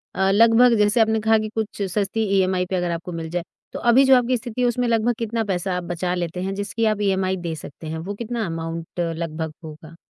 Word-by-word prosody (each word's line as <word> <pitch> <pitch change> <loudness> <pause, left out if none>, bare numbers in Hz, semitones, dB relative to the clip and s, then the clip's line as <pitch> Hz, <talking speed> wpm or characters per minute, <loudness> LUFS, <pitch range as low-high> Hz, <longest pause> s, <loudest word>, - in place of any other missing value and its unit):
अ 190 0 +2
लगभग 230 +3 +6
जैसे 210 +2 +3
आपने 220 0 +2
कहा 220 +1 +4
कि 215 0 -3
कुछ 220 -2 -3
सस्ती 205 +3 0 0.2
इएमआई 185 -1 +1
पर 185 - -3
अगर 175 -1 -1
आपको 170 +1 -5
मिल 165 -1 -5
जाए 175 +1 -2 0.3
तो - - -4
अभी 240 +3 +5
जो 265 0 +7
आपकी 250 0 +1
स्थिति 240 +2 -5
है 245 - +3
उसमें 245 0 0
लगभग 230 +1 +2
कितना 230 0 -1
पैसा 190 -2 -2
आप 180 - -4
बचा 175 +1 -2
लेते 175 0 -3
हैं 195 - -2
जिसकी 205 +3 -2
आप 210 - -6
इएमआई 190 -1 +1
दे 170 -2 -4
सकते 155 +1 -10
हैं। 160 - -4
वो 180 +5 -5
कितना 235 +1 -3
अमाउंट 165 0 -5
लगभग 165 -2 -3
होगा? 155 +1 -11
190 Hz, 230 wpm, -22 LUFS, 170-225 Hz, 0.3 s, जो